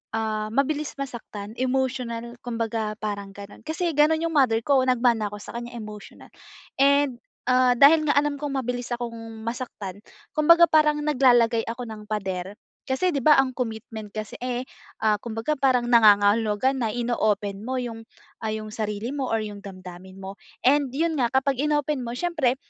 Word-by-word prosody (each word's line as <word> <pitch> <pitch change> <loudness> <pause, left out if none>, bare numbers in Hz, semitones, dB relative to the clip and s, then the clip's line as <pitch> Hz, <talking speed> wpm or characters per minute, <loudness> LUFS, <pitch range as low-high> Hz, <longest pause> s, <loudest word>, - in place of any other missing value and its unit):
ah, 215 -1 -1
mabilis 290 +2 0
masaktan, 220 -5 -7
emotional, 250 -2 -2
kumbaga 225 -2 -2
parang 200 -2 -4
ganun. 200 0 -11
Kasi 330 +2 -1
ganun 315 +2 +4
yung 330 -1 -2
mother 230 -4 +3
ko, 275 -2 +4
nagmana 240 -3 +2
ako 210 - -7
sa - - -10
kanya, 240 0 -7
emotional, 210 -2 -10 0.5
and, 280 -2 +4 0.3
ah, 255 0 +5
dahil 310 +3 +6
nga 290 - +4
alam 290 0 +2
kong 290 -2 -3
mabilis 245 0 -4
akong 230 -2 -6
masaktan, 215 -5 -6 0.4
kumbaga 335 +3 +7
parang 300 -1 +3
naglalagay 245 -5 +4
ako 235 +2 -5
ng 210 -1 -9
pader. 190 -2 -3 0.4
Kasi 355 +8 +1
di 280 - 0
ba 300 -2 +7
ang 260 -1 +1
commitment 220 -3 -5
kasi, 215 -1 -6
eh, 250 0 -3 0.4
ah, 215 - +5
kumbaga 225 +5 -2
parang 255 -3 +3
nangangahulugan 215 +3 +4
na 225 - 0
ino-open 215 -4 -1
mo 260 +2 -3
yung, 230 -2 -4 0.4
ah, 220 - -1
yung 215 0 -5
sarili 215 +2 -3
mo 275 -3 -2
or 225 - +2
yung 205 -1 -8
damdamin 185 -1 -10
mo, 190 +1 -7 0.3
and 280 0 +4
yun 325 +3 0
nga 240 -2 +2
kapag 265 0 +1
inopen 295 -2 0
mo 235 0 -5
syempre 310 -7 +1
240 Hz, 165 wpm, -25 LUFS, 215-275 Hz, 0.5 s, kumbaga